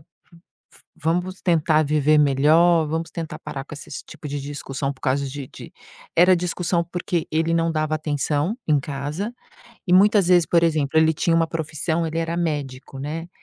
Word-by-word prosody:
v 150 - -24 1.0
vamos 180 +4 -1
tentar 160 -3 +2
viver 150 +1 +3
melhor, 155 +4 +4
vamos 160 +2 -3
tentar 165 -2 -6
parar 135 -1 -6
com 145 - -11
esses 145 - -8
tipo 150 - -10
de 145 0 -4
discussão 140 -1 -4
por 135 - -14
causa 140 0 0
de 140 -1 -7
de". - - -12 0.4
Era 180 +2 +6
discussão 175 0 -1
porque 175 0 -3
ele 165 +1 +1
não 165 0 +1
dava 155 -1 -1
atenção 150 - -1
em 150 -2 +3
casa. 145 - -4 0.5
E 180 - +1
muitas 200 0 +5
vezes, 175 -3 +5
por 170 -1 +3
exemplo, 155 -2 +1
ele 160 0 +4
tinha 165 +2 +1
uma 165 0 +3
profissão, 160 +1 -2
ele 160 +1 -3
era 165 +1 -2
médico, 140 -5 -3
né. 160 +5 -5
160 Hz, 175 wpm, -22 LUFS, 145-170 Hz, 1.0 s, Era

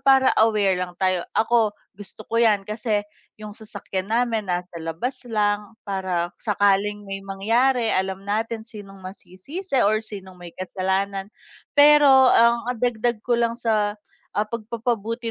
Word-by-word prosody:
para 270 -1 +5
aware 210 -3 +3
lang 180 -1 -5
tayo. 185 -2 0
Ako 220 -2 +2 0.2
gusto 205 +2 -8
ko 230 - +1
yan, 210 -4 +3
kasi 215 0 -2 0.3
yung 210 -1 -9
sasakyan 200 -2 -6
namin 225 -4 0
nasa 180 0 -3
labas 175 +12 -4
lang 210 0 -1
para 185 -3 -2
sakaling 205 0 +1
may 195 0 -6
mangyari 230 +6 +1
alam 190 +1 -2
natin 220 +2 -2
sinong 205 -4 -11
masisisi 195 - -5
or 215 +1 +2
sinong 195 -4 -9
may 175 -1 -10
kasalanan. 190 +1 -2 0.5
Pero 295 0 +8 0.3
ang, 235 0 +4
ah, 250 - 0
dagdag 240 -1 -1
ko 240 0 +1
lang 230 -1 +1
sa, 215 -3 0 0.4
ah, 210 - +2
pagpapabuti 230 0 -3
210 Hz, 140 wpm, -23 LUFS, 195-230 Hz, 0.5 s, Pero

